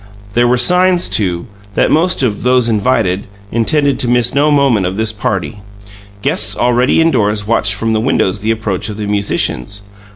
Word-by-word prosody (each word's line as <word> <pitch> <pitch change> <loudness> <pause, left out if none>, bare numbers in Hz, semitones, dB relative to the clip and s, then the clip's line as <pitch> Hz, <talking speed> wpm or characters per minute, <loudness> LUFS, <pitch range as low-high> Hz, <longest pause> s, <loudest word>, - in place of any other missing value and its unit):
There 120 +1 +2
were 125 +1 +2
signs, 180 +4 +3
too, 90 -3 0 0.3
that - - +2
most 170 -1 +1
of 105 -5 -1
"those 125 -1 +2
invited" 100 -4 0 0.2
intended 140 +5 0
to 125 - -1
miss 120 0 +1
no 145 +2 +2
moment 135 -10 +2
of 95 +2 -5
this 110 0 -1
party; 100 -3 -3 0.6
guests - - 0
already 125 +3 +2
indoors 110 -10 +1
watched 105 -3 +1
from 115 +1 -1
the 110 - 0
windows 105 -5 0
the 105 +2 -3
approach 110 -3 -2
of 105 - -7
the 105 - -4
musicians. 100 -3 -2
110 Hz, 170 wpm, -14 LUFS, 100-130 Hz, 0.6 s, signs